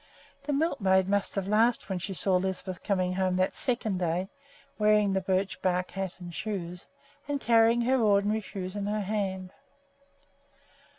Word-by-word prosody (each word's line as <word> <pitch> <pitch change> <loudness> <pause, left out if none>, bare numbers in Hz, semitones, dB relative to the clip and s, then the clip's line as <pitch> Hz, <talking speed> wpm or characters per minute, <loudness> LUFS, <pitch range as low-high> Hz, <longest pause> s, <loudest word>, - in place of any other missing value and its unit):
The 295 - -1
milkmaid 200 - +2
must 200 0 0
have 195 -1 -2
laughed 225 +4 +2
when 190 -2 -2
she 195 +2 -5
saw 185 +1 +2
Lisbeth 185 -1 -3
coming 185 -2 0
home 185 -1 0
that 185 0 +1
second 220 -6 0
day 180 +2 -1 0.5
wearing 210 -1 +4
the 190 - +1
birch 190 +1 -1
bark 180 -1 0
hat 190 -1 -5
and 175 -1 -8
shoes, 175 +1 -5 0.4
and 290 -1 -1
carrying 230 -1 +4
her 255 +1 +2
ordinary 210 0 +2
shoes 185 -1 -6
in 205 -1 -3
her 210 +1 -1
hand. 190 -2 -3
195 Hz, 160 wpm, -28 LUFS, 185-215 Hz, 0.5 s, wearing